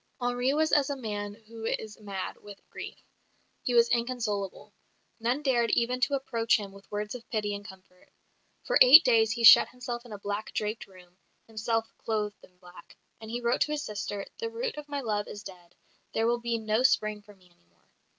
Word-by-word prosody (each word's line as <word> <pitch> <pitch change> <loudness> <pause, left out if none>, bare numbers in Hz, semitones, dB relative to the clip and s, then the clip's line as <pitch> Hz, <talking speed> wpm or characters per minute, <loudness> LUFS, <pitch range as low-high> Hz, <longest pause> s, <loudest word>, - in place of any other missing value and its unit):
Henri 245 +1 0
was 310 +2 +1
as 290 -2 +3
a 285 - -1
man 205 -5 -5
who 225 0 -10
is 220 -1 -4
mad 200 -3 -5
with 205 -1 -13
grief; - - -9 0.6
he 245 - -1
was 235 0 +6
inconsolable.. 230 -5 -2 0.5
None 245 +6 -1
dared 240 -4 +2
even 240 +3 +1
to 275 +2 +2
approach 235 -4 +1
him 205 -2 -7
with 195 0 -16
words 210 0 -3
of 245 -2 -10
pity 210 -3 -1
and 200 0 -6
comfort. 185 -2 -16 0.6
For - - +2
eight 275 +6 +10
days 225 -3 +4
he 235 0 -4
shut 225 - +10
himself 245 -1 -6
in 240 - -14
a 210 - -6
black 205 +1 -5
draped 215 +1 -3
room, 180 -2 -18 0.3
himself 225 +1 -2
clothed 210 -2 -3
in 180 - -20
black; 180 -1 -16 0.2
and 220 - -10
he 240 +2 -3
wrote 235 +1 0
to 300 - +2
his 295 -1 -2
sister, 205 -1 -4
"The 460 - -3
root 465 +1 -4
of 300 -1 -9
my 285 -1 -3
love 210 -4 -2
is 205 - -8
dead; 180 -3 -13 0.4
there 225 - +2
will 240 +1 +1
be 235 -1 -1
no 220 +1 0
Spring 215 -4 +2
for 205 0 -17
me 180 -2 -25
any 130 - -34
more." 85 0 -36
225 Hz, 205 wpm, -28 LUFS, 205-245 Hz, 0.6 s, eight